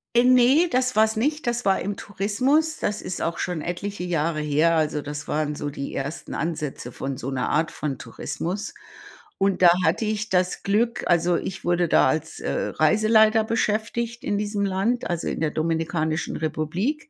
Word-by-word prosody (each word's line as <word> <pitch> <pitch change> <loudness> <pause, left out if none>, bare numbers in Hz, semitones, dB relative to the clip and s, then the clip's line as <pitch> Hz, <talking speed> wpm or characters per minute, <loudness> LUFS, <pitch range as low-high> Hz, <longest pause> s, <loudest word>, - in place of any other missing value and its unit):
Äh, 240 - +6
ne, 255 +6 +5
das 255 0 +1
war's 220 +1 +3
nicht, 295 +7 -1
das 240 0 -1
war 195 -1 +3
im 205 +1 -3
Tourismus. 255 - 0
Das 210 0 -2
ist 185 - -5
auch 165 - -1
schon 175 -4 -2
etliche 180 +3 -4
Jahre 165 -2 0
her, 150 +3 +2
also 155 -2 0
das 145 0 -6
waren 150 -1 -1
so 145 - -4
die 140 -1 -6
ersten 140 +4 -5
Ansätze 155 -6 -4
von 135 +2 -4
so 130 - -5
'ner 130 -2 -1
Art 160 +1 +1
von 140 -4 -4
Tourismus 195 +5 -5 0.6
und 195 -1 +1
da 175 - +9 0.2
hatte 225 - +1
ich 215 0 -2
das 180 -1 0
Glück 230 +4 +1
also 175 0 +3
ich 190 0 -5
wurde 175 0 +2
da - - +4
als, 160 0 -2
äh, - - -3 0.2
Reiseleiter 215 +6 +4
beschäftigt 225 +2 -1
in 205 - 0
diesem 205 -1 -1
Land, 200 +6 0
also 170 -1 -2
in - - -3
der 155 -2 +1
Dominikanischen 160 0 -1
Republik, 175 - -2
185 Hz, 180 wpm, -24 LUFS, 155-220 Hz, 0.6 s, da